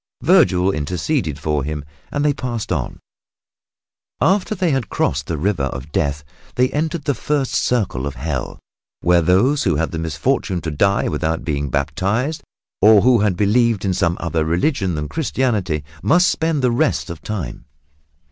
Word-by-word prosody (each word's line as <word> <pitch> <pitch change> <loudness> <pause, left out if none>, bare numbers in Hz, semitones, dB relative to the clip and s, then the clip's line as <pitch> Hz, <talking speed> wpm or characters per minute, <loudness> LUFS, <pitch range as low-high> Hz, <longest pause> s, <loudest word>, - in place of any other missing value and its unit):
Vergil 100 - +4
interceded 85 - -2
for 75 -3 -1
him, 75 0 -4 0.3
and 145 0 -1
they 145 - +3
passed 120 -6 -4
on. 70 -9 -2 1.2
After 200 +2 +2
they 180 -4 +1
had 135 -7 -1
crossed 70 +3 -1
the 85 - -2
River 85 -3 0
of 70 +2 -6
Death 75 0 -1 0.3
they 125 +1 +3
entered 155 +1 -2
the 145 - +2
first 140 -1 -1
circle 95 - 0
of 70 - -5
Hell, 65 -1 -4 0.4
where 85 0 +4
those 100 - +3
who 90 -5 +1
had 80 +2 -1
the 80 - -4
misfortune 90 - -1
to 80 - -4
die 100 +7 +2
without 80 +2 -2
being 70 -3 -2
baptized, 100 - -1 0.4
or 105 0 +7
who 125 +1 +4
had 100 -4 +1
believed 110 0 +2
in 95 - +1
some 85 -1 0
other 80 -1 -1
religion 90 - 0
than 75 0 -3
Christianity, 110 - -1 0.2
must 180 +4 +4
spend 160 -4 -1
the 125 - +3
rest 115 - 0
of 85 - -8
time. 95 - -5
95 Hz, 165 wpm, -20 LUFS, 80-130 Hz, 1.2 s, or